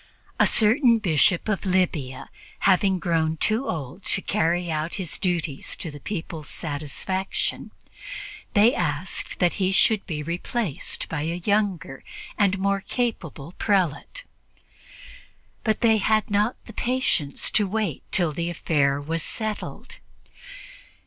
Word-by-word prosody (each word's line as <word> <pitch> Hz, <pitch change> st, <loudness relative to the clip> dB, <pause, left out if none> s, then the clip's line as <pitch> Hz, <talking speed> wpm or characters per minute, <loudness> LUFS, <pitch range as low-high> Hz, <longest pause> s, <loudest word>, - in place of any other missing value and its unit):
A -, -, +6 dB
certain 230 Hz, +2 st, +5 dB
Bishop 175 Hz, -3 st, +3 dB
of 210 Hz, -3 st, 0 dB
Libya 175 Hz, -9 st, 0 dB, 0.3 s
having 190 Hz, 0 st, +4 dB
grown 165 Hz, -3 st, 0 dB
too 220 Hz, -, +1 dB
old 155 Hz, +3 st, -5 dB
to 190 Hz, -, +3 dB
carry 175 Hz, -3 st, +1 dB
out 155 Hz, +2 st, -2 dB
his 185 Hz, -6 st, -3 dB
duties 170 Hz, -7 st, -1 dB
to 165 Hz, -, -5 dB
the 145 Hz, -, -10 dB
people's 160 Hz, -3 st, -5 dB
satisfaction, 165 Hz, +5 st, -3 dB, 0.9 s
they 215 Hz, +4 st, +6 dB
asked 165 Hz, 0 st, -3 dB
that 175 Hz, -1 st, +2 dB
he 185 Hz, 0 st, +3 dB
should 210 Hz, +2 st, +4 dB
be 150 Hz, -4 st, -3 dB
replaced 175 Hz, -, -2 dB
by 160 Hz, -3 st, -3 dB
a 165 Hz, +3 st, -2 dB
younger 200 Hz, -9 st, 0 dB, 0.3 s
and 200 Hz, -1 st, +2 dB
more 195 Hz, +1 st, +1 dB
capable 180 Hz, -, -3 dB
prelate. 195 Hz, -, 0 dB, 1.4 s
But 220 Hz, -2 st, 0 dB
they 225 Hz, -2 st, +5 dB
had 215 Hz, +1 st, +2 dB
not 210 Hz, +4 st, +2 dB
the 225 Hz, -, -11 dB
patience 235 Hz, -, 0 dB
to 210 Hz, -2 st, +2 dB
wait 205 Hz, -6 st, -1 dB
till 175 Hz, -4 st, +2 dB
the 170 Hz, +3 st, -2 dB
affair 145 Hz, -4 st, +1 dB
was 165 Hz, +3 st, -3 dB
settled. 215 Hz, +3 st, -5 dB
180 Hz, 130 wpm, -25 LUFS, 160-210 Hz, 1.4 s, A